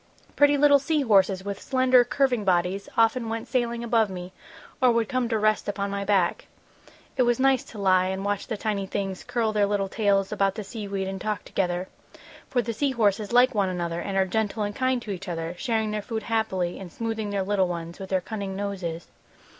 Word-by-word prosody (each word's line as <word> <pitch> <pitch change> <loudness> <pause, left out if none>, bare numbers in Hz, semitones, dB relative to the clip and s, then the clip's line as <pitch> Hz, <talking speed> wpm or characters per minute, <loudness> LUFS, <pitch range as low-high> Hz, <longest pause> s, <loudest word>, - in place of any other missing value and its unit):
"Pretty 290 0 +5
little 285 0 +6
sea 300 +2 0
horses 195 -4 +3
with 200 -1 -4
slender, 255 -2 +4
curving 245 -2 +1
bodies 185 +1 0
often 230 +1 +3
went 225 +1 -4
sailing 235 -2 -1
above 225 -2 +2
me, 180 0 -7 0.5
or 255 -1 +6
would 230 -1 +1
come 255 -3 -1
to 225 - +1
rest 215 0 +1
upon 200 0 -2
my 200 0 -2
back. 195 -3 +1 0.7
It - - +3
was 240 -1 +2
nice 265 -1 +3
to 220 - -12
lie 185 -2 +3
and 190 +1 -3
watch 205 -1 -2
the 220 - -3
tiny 200 -2 -2
things 195 -1 -3
curl 225 -3 -1
their 205 -1 +2
little 200 -1 0
tails 200 -2 +1
about 195 -1 +1
the 215 - -5
sea 210 0 -7
weed 195 -1 -3
and 190 -1 -5
talk 215 -1 -3
together, 180 -1 -1 0.6
for 245 -2 +1
the 230 +1 -3
sea 275 +4 0
horses 210 -2 +1
like 250 +2 +5
one 200 -3 +1
another 170 -2 -3
and 195 -1 -3
are 190 - +4
gentle 215 +2 -1
and 205 0 -3
kind 255 -1 +1
to 210 - -5
each 195 +1 -6
other, 165 -1 -3
sharing 220 -3 0
their 210 0 -2
food 220 +1 -4
happily 200 -6 -1
and 185 -3 -9
smoothing 225 0 -3
their 200 -1 -1
little 190 -1 +1
ones 170 -1 -6
with 190 -1 -7
their 190 -1 +1
cunning 200 -1 -5
noses. 190 -4 -4
205 Hz, 215 wpm, -25 LUFS, 190-230 Hz, 0.7 s, little